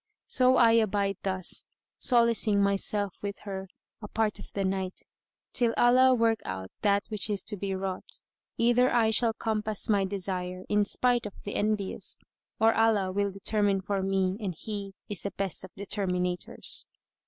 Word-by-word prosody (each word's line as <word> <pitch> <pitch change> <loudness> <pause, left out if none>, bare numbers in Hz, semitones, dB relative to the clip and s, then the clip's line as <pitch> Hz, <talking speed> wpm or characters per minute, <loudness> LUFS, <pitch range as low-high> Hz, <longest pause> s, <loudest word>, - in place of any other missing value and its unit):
[FN#136] - - -2
So 255 0 +5
I 230 -2 +6
abide 205 -3 +1
thus, 190 -2 +1 0.4
solacing 235 -4 +3
myself 200 0 +1
with 200 -1 -4
her 195 -2 -6 0.3
a 210 - -7
part 220 0 -1
of - - -11
the 195 -1 -1
night, 190 -1 -3 0.5
till 235 -2 +2
Allah 255 +1 +5
work 230 -2 +2
out 95 -1 -6
that 200 -1 +2
which 215 0 -1
is 200 -3 0
to 210 - -1
be 195 0 -3
wrought; 190 -1 -5 0.3
either 240 +2 +3
I 230 -2 +3
shall 225 +1 +4
compass 215 -1 -1
my 200 -2 +3
desire, 185 -2 -3
in 210 0 +2
spite[FN#137] 245 +2 +1
of 205 - -10
the 205 - -5
envious, 210 -2 -1 0.4
or 225 +1 +4
Allah 215 -4 +2
will 200 +1 0
determine 200 0 +1
for 195 +1 -2
me 190 0 0
and 195 -6 -4
He 200 -1 -6
is 205 -4 -4
the 200 - -3
best 195 -3 -3
of 190 - -9
determinators." 180 -3 -2
205 Hz, 165 wpm, -28 LUFS, 190-225 Hz, 0.5 s, I